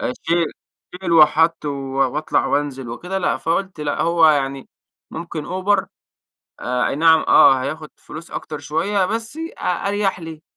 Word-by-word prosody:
آآ - - -2
شيل 170 0 +1 0.5
شيل 175 -3 -2
وحط 165 +1 +4
و 145 - -1 0.4
وأطلع 150 +1 0
وأنزل 135 -4 -2
وكده 180 +11 -4
لأ، 185 - 0
فقُلت 170 +1 -2
لأ 150 -1 -2
هو 165 -1 +4
يعني 135 -2 0 0.4
ممكن 160 -2 -6
Uber 190 +1 0 0.8
آآ 125 0 -1
أَي - - -3
نعم، 160 +1 +5
آه 130 -1 +6
هياخد 155 +3 -5
فلوس 165 +2 -11
أكتر 150 - -6
شوية 175 +7 -1
بس 225 +6 -4
أ 325 +1 -7 0.3
أريح 200 -2 -1
لي، 160 -2 -9
165 Hz, 155 wpm, -20 LUFS, 150-185 Hz, 0.8 s, آه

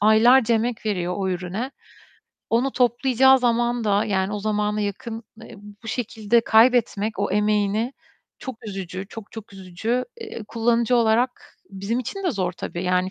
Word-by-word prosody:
aylarca 230 +3 +5
emek 225 0 -1
veriyor 180 -4 -1
o 190 -1 -1
ürüne. 185 +8 -3 0.8
Onu 250 +4 +1
toplayacağı 255 +2 +4
zaman 240 -1 +1
da, 205 0 +2
yani, 195 -2 -1
o - - -2
zamana 210 0 -1
yakın, 225 +3 -4 0.2
eee, 230 - -11 0.3
bu 225 - -8
şekilde 230 -1 +1
kaybetmek 225 -2 +3
o 200 -1 0
emeğini 210 +3 +1 0.5
çok 260 -4 -7
üzücü. 190 -1 -6
Çok 220 -2 -10
çok 220 -2 -10
üzücü. 195 +6 -3 0.2
Eee, 430 - -7
kullanıcı 235 +1 +2
olarak 235 +2 +1 0.2
bizim 200 +4 -3
için 390 - -5
de 360 - +2
zor 185 - -2
tabii. 175 -1 -6
Yani 180 +1 +1
220 Hz, 150 wpm, -23 LUFS, 200-240 Hz, 0.8 s, aylarca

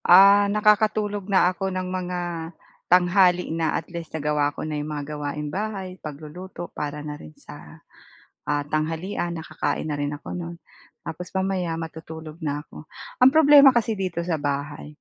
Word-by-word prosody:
Ah. 200 +2 +8
Nakakatulog 210 -1 +2
na 190 - +6
ako 195 - -7
ng 185 0 -2
mga 180 0 -3 0.7
tanghali 180 0 +5
na. 160 - +1
At - - -11
least 170 -2 -6
nagawa 150 -1 +1
ko - - -9
na 155 -1 -3
'yong 150 - -4
mga 145 -1 -4
gawaing 145 0 -4
bahay, 205 -3 -3 0.2
pagluluto 155 +5 -8 0.2
para 150 0 -3
na 150 - -5
rin 75 0 -12
sa, - - -9 1.0
ah, 145 0 +1
tanghalian, 165 +3 -1
nakakain 155 0 -3
na 150 - -2
rin 145 0 -1
ako - - -13
no'n. 170 0 -6 0.5
Tapos 180 +3 -6
mamaya, 190 -3 -1
matutulog 160 -1 -9
na 145 - 0
ako. - - -16 0.5
Ang 260 - +9
problema 290 -2 +9
kasi 230 -1 +2
dito 170 -2 -2
sa 160 - +2
bahay, 145 +1 -4
170 Hz, 160 wpm, -24 LUFS, 150-190 Hz, 1.0 s, Ang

